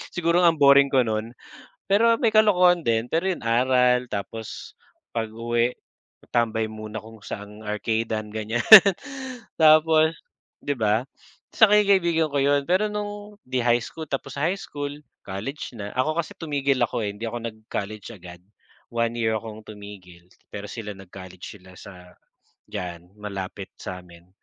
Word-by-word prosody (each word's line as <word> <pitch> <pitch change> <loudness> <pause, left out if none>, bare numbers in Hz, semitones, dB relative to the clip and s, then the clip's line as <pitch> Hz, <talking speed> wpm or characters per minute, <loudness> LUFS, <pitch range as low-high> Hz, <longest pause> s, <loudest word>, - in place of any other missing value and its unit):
Siguro 170 +1 +2
ang 165 -2 +4
boring 140 0 +6
ko 130 -2 +3
no'n. 110 +1 -2 0.6
Pero 230 +4 +4
may 235 - +3
kalokohan 180 -5 +5
din 115 0 +1
pero 165 +3 0
yun 180 - -3
aral, 125 +1 +3
tapos 110 +2 -6 0.4
pag-uwi, 115 +2 -1 0.6
tambay 115 -2 +1
muna 110 0 -7
kung 110 -1 -14
saang 105 +1 -8
arcade-an, 110 0 -2
ganyan. 110 +2 -2 1.0
Tapos 155 0 +5 0.5
'di 145 - 0
ba? 110 +2 +1 0.5
Saka 210 -2 +6
yung 205 - -1
kaibigan 170 -4 +3
ko 145 - 0
yun 140 0 +3
pero 205 +4 +2
no'ng 205 0 -6
'di 130 -1 -1
high 120 0 +3
school 160 - -7
tapos 135 0 -4
high 170 +7 0
school, 145 -4 -6 0.3
college 110 +10 -6
na. 100 -1 -5
Ako 155 +5 0
kasi 160 - -8
tumigil 140 -4 -1
ako, - - -3
eh, 100 - -4
hindi 110 +3 -8
ako 120 +1 -4
nag-college 110 -1 -6
agad. 90 -2 -12 0.5
1 115 0 0
year 110 -1 +1
akong 110 0 -7
tumigil, 100 -4 -12 0.2
pero 100 - -7
sila 105 -1 -7
nag-college 95 +1 -11
sila 95 0 -16
sa, 90 -1 -13 0.6
diyan 90 -2 -7
malapit 100 -1 -7
sa'min. 90 -1 -10
115 Hz, 145 wpm, -24 LUFS, 105-155 Hz, 1.0 s, boring